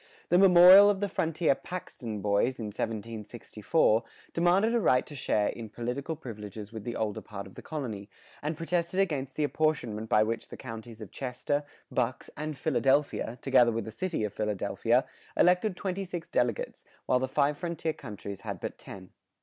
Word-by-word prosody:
The 175 - +5
memorial 190 +1 +9
of 200 -2 +1
the 205 - 0
frontier 165 -4 +1
"Paxton 125 - -6
Boys," 105 +6 +1
in 115 - -5
1764, 110 +3 0 0.3
demanded 185 +7 +3
a 240 - +3
right 130 - +3
to - - -11
share 110 -6 +1
in 115 -2 -6
political 125 +8 -4
privileges 105 - -8
with 110 -2 -7
the 120 - -3
older 105 -2 -2
part 100 -1 -8
of 95 - -13
the - - -10
colony, 110 -10 -5 0.3
and 150 +1 -3
protested 170 +2 -1
against 140 -8 0
the 155 - 0
apportionment 125 -8 0
by 105 - +5
which 115 +1 -3
the - - -10
counties 115 0 -9
of 105 - -9
Chester, 130 +3 -2 0.3
Bucks, 125 +1 -2
and 150 0 -4
Philadelphia, 135 -4 +1
together 120 -1 +5
with 115 -2 -2
the 110 - -6
city 180 -1 -2
of 105 -1 -2
Philadelphia, 105 -2 0 0.3
elected 180 +3 +4
twenty 190 +1 -3
six 175 -3 -6
delegates, - - -1 0.2
while 125 - +3
the 130 - -1
five 145 +2 +2
frontier 165 0 -3
counties 100 -6 -8
had - - -5
but - - -6
ten. 95 -2 -10
130 Hz, 175 wpm, -29 LUFS, 110-170 Hz, 0.3 s, memorial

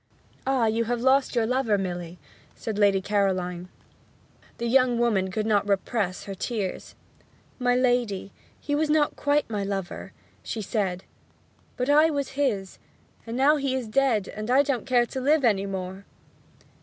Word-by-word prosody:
'Ah, 265 -3 +2
you 225 +1 +1
have 240 +1 -1
lost 265 +2 +2
your 230 -2 +2
lover, 235 -3 +1
Milly,' 175 -2 -4 0.4
said 215 -2 -4
Lady 200 -2 +3
Caroline. 185 -3 -1 0.9
The 235 - -3
young 250 0 +3
woman 215 -6 +1
could 215 +3 -2
not 205 -2 +2
repress 195 -1 -1
her 195 - -6
tears. 200 -1 -4 0.6
'My 245 -1 +2
lady, 245 -6 0 0.3
he 290 - -4
was 300 +1 +1
not 300 -1 +2
quite 290 0 +1
my 210 -3 -3
lover,' 195 -2 -4 0.3
she 220 - -5
said. 190 -3 -2 0.7
'But 250 - -1
I 300 +3 +5
was 285 -3 -2
his 245 -9 -2 0.5
and 230 +1 -4
now 290 +3 +4
he 275 -2 -1
is 255 -3 -3
dead 220 -4 +1 0.2
I 265 +3 +5
don't 275 -4 -2
care 245 -2 +3
to 260 +2 -5
live 290 +1 +3
any 200 -3 +2
more!' 190 0 -5
230 Hz, 155 wpm, -26 LUFS, 195-265 Hz, 0.9 s, I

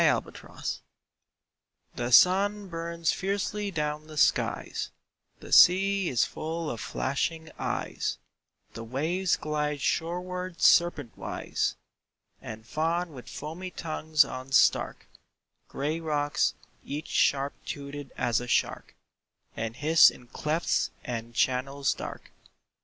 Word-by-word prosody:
A - - +4
PICTURE - - -13 1.3
THE 120 0 -2
sun 200 - +5
burns 170 -1 -1
fiercely 200 +1 -2
down 150 -3 -3
the 155 -1 -10
skies; - - +1 0.5
The - - -11
sea 195 +1 +6
is 120 -2 +2
full 160 0 -4
of 115 - -6
flashing 160 +4 -2
eyes; - - -2 0.6
The 115 - -7
waves 160 +10 0
glide 150 -1 -2
shoreward 180 +3 -2
serpentwise 165 -8 +2 0.7
And 110 0 -8
fawn 165 +5 -1
with 125 -3 -10
foamy 175 +5 -6
tongues 155 -3 +1
on 130 0 -7
stark - - +3 0.6
Gray 150 +4 -2
rocks, 150 -2 0 0.3
each 150 +2 -5
sharp 140 0 +2
toothed 140 -1 -6
as 120 -1 +1
a 125 - -6
shark, - - 0 0.6
And 115 0 -4
hiss 155 +4 +7
in 125 - -12
clefts 155 +6 0
and 120 -1 -5
channels 130 +2 +1
dark. - - -8
155 Hz, 115 wpm, -28 LUFS, 135-170 Hz, 1.3 s, hiss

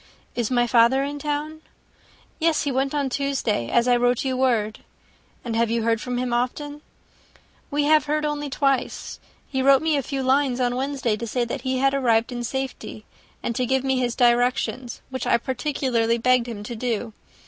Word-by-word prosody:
"Is 235 -3 -1
my 240 -1 +2
father 240 +3 +4
in 290 +1 -4
town?" 300 +2 -3 0.8
"Yes, 325 -1 +2
he 285 - -1
went 270 +2 0
on 285 -2 0
Tuesday, 265 - -1
as 235 +1 +2
I 245 - +5
wrote 245 +1 +1
you 260 -1 0
word." 230 -5 +1 0.7
"And 230 -2 -3
have 230 0 +2
you 230 0 0
heard 225 -1 +1
from 250 -1 -3
him 245 -1 -1
often?" 290 +5 -2 0.9
"We 290 +1 0
have 305 -1 +4
heard 300 +1 0
only 295 -1 -2
once. 275 -3 0 0.3
He 265 -1 -2
wrote 275 +2 +5
me 320 -1 +2
a 280 - +1
few 270 +1 -3
lines 260 -1 +2
on 245 -1 +1
Wednesday, 265 -3 -1
to 235 - -5
say 240 +2 0
that 235 +3 -4
he 260 0 -1
had 270 +1 +2
arrived 235 -4 +2
in 240 -1 -4
safety, 265 -4 -5 0.4
and 235 - -2
to 250 +1 0
give 265 +1 +1
me 265 -1 +1
his 245 -2 -1
directions, 245 0 +1
which 260 - -3
I - - +4
particularly 245 -2 0
begged 250 0 +2
him 215 -4 -6
to 235 +3 -6
do. 230 -1 -3
255 Hz, 190 wpm, -23 LUFS, 235-275 Hz, 0.9 s, I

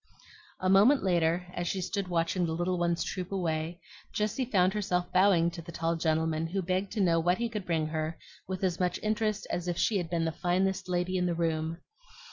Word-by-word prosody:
A 185 - -1
moment 205 +9 +5
later, 175 -1 +2
as 175 0 -3
she 190 - -1
stood 195 +1 -2
watching 175 +1 0
the 160 - -2
little 175 +1 -1
ones 170 -1 +1
troop 185 -1 -4
away, 170 -2 -2 0.3
Jessie 215 +5 -1
found 190 -5 +3
herself 180 -4 -1
bowing 185 -3 +4
to 170 - -7
the 170 +1 -10
tall 165 0 -1
gentleman, 160 0 0
who 190 +3 -2
begged 185 +2 -1
to 215 - -3
know 170 -3 +3
what 175 +2 +2
he 235 - -1
could 210 -4 -5
bring 165 -2 +1
her 155 +1 -3 0.3
with 185 0 -4
as 180 -2 0
much 180 -1 0
interest 215 -1 0
as 175 0 -2
if 175 -1 -1
she 210 +3 +2
had 175 -3 -3
been 170 -1 0
the 160 - 0
finest 185 +3 0
lady 180 +1 0
in 180 0 +1
the 170 - 0
room. 165 -1 -1
180 Hz, 215 wpm, -30 LUFS, 165-190 Hz, 0.3 s, moment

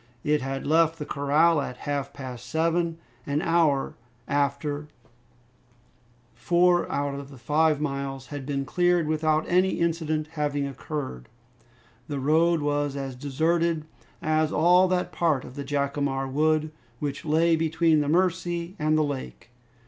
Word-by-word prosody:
It 150 -1 +1
had 135 +1 -4
left 160 +1 +3
the 150 - -5
corral 150 +3 +2
at 125 -2 -5
half 140 -1 -2
past 125 -3 -8
seven. 165 +3 0 0.3
An 145 +1 0
hour 160 -4 +2 0.3
after, 145 +1 -1 1.5
four 175 0 +2
out 140 0 -1
of 140 0 -7
the 135 - -12
five 150 +4 +2
miles 140 -2 -3
had 145 -2 -5
been 140 0 -2
cleared, 175 +2 +2
without 155 0 +1
any 185 +2 +3
incident 160 -2 -1
having 145 -2 -1
occurred. 135 - -6 0.8
The 145 -2 -3
road 160 +4 +3
was 145 -1 0
as 135 -2 -4
deserted 160 +4 0 0.4
as 155 0 +1
all 180 +3 +5
that 180 0 -1
part 155 -6 0
of - - -10
the 140 +1 -5
Jacamar 140 -1 -1
Wood 155 +3 +1 0.3
which 140 +1 -4
lay 165 +2 +3
between 160 0 +2
the 145 - -1
Mercy 175 +1 0
and 155 +1 +2
the 155 - +3
lake. 135 -4 -6
150 Hz, 140 wpm, -26 LUFS, 140-165 Hz, 1.5 s, all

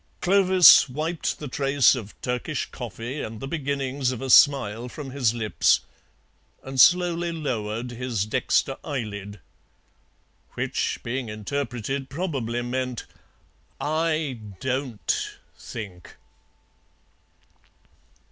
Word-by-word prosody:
Clovis 185 -5 +7
wiped 155 +5 -2
the 150 - -7
trace 135 0 +3
of 110 -6 -7
Turkish 125 +5 -2
coffee 120 +3 -6
and 110 0 -6
the 135 - -5
beginnings 140 -3 -2
of 125 - -5
a 135 -1 -2
smile 125 -5 +5
from 135 0 -8
his 125 -4 +1
lips, 110 -2 +2 0.8
and 135 0 -5
slowly 175 -1 +4
lowered 120 -7 -3
his 120 -4 -2
dexter 130 +4 0
eyelid. 105 -8 -5 1.1
Which, - - -1
being 120 0 -3
interpreted, 130 +4 -4
probably 135 -7 -3
meant, 125 0 -3 0.7
"I 155 -4 -1 0.2
DON'T 130 - -2 0.2
think!" 100 -7 -9
130 Hz, 100 wpm, -25 LUFS, 115-145 Hz, 1.1 s, Clovis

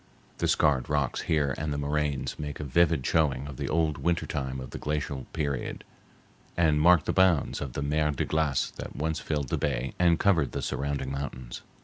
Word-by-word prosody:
The - - +1
scarred 70 -5 +2
rocks 70 -3 0
here 70 -4 +2
and 75 0 -2
the 70 - -1
moraines 70 -2 -1
make 75 -1 -5
a - - -3
vivid 75 -1 +2
showing 70 -4 +2
of 70 -3 -8
the - - -3
old 80 -3 +1
winter 85 +4 0
time 65 -3 -3
of 65 - -8
the - - -6
glacial 75 -3 -3
period, 70 -4 -3 0.7
and 80 -3 +3
mark 85 -1 +6
the - - 0
bounds 95 -6 +3
of 70 -4 -4
the 70 - -2
mer 75 +1 +1
de 70 - -1
glace 75 -4 0
that - - -7
once 80 +2 -1
filled 75 -4 -2
the - - -1
bay 70 -2 -1
and 85 -2 +4
covered 80 -9 +2
the - - -3
surrounding 70 -1 -2
mountains. 65 -3 -5
75 Hz, 200 wpm, -28 LUFS, 70-80 Hz, 0.7 s, mark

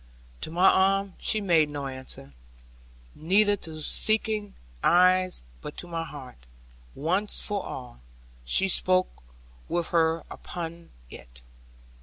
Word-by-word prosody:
To - - -4
my 175 +4 +3
arm 195 0 +3
she 215 - +3
made 165 -7 +3
no 145 -1 -5
answer, 130 - -6 0.8
neither 205 - +3
to 160 -4 -9
my 155 - -8
seeking 215 +4 0 0.3
eyes; 185 - +3 0.2
but - - -8
to - - -5
my 165 -1 -4
heart, 135 -4 -10 0.6
once 185 +8 0
for 205 -2 -1
all, 125 - -8 0.4
she 125 - +4
spoke 185 0 +2 0.5
with 175 -1 -1
her 165 -1 +2
own - - -21
upon 170 -1 -7 0.2
it. - - -13
170 Hz, 130 wpm, -26 LUFS, 150-195 Hz, 0.8 s, she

